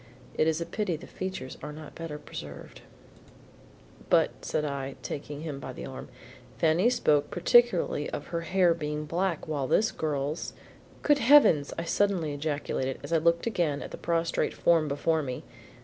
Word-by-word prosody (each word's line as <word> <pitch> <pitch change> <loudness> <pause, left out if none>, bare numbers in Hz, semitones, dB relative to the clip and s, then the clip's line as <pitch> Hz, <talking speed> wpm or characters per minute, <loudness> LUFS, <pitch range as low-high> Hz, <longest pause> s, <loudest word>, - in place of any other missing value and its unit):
"It 155 - +2
is 160 0 +1
a 170 - -2
pity 205 -4 -2
the 155 - -9
features 190 -8 -6
are - - -6
not 150 0 -10
better 165 -3 -6
preserved." 75 - -9 1.3
"But," - - +4
said 150 - -1
I, 140 -2 -4
taking 145 0 -5
him 150 -4 -5
by - - -7
the - - -7
arm, - - -8 0.5
"Fanny 165 +8 +3
spoke 150 -11 +2
particularly 185 -5 +3
of - - -5
her 170 -1 -2
hair 175 0 +3
being 150 -2 -3
black, 170 +2 -1
while 145 -4 -1
this 215 +9 +3
girl's 150 0 -2 0.5
Good 295 -1 +4
heavens!" 230 - +6
I 165 - -2
suddenly 170 -3 +1
ejaculated 145 -3 -2
as - - -4
I - - +5
looked 170 +1 +2
again 170 -10 0
at - - -8
the - - -6
prostrate 170 0 0
form 165 -3 +3
before 155 +3 +1
me. 130 -3 -5
160 Hz, 165 wpm, -28 LUFS, 145-170 Hz, 1.3 s, heavens